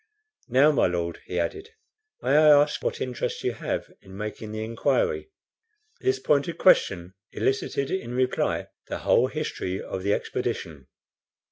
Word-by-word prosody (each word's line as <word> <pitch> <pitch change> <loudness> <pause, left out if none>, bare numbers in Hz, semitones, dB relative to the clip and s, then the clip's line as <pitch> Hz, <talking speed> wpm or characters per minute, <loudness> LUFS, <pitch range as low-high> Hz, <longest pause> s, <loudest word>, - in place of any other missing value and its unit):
"Now, 135 +4 +5
my 145 - +3
Lord," 85 -1 -2
he 90 - -2
added, 390 - -3 0.5
"may 130 - +1
I 155 0 +7
ask 150 +1 +1
what - - -1
interest 125 -1 -3
you - - +1
have - - -4
in 95 0 -12
making 105 +1 -5
the 110 0 -4
inquiry?" 120 - 0 0.7
This 390 +1 +1
pointed 150 - +1
question 95 - +3 0.2
elicited 135 +1 -1
in 125 -11 -3
reply 130 0 0 0.2
the - - -3
whole - - +4
history 95 0 -3
of 95 - -5
the 100 +2 +2
expedition. 70 -6 -4
120 Hz, 145 wpm, -26 LUFS, 95-145 Hz, 0.7 s, I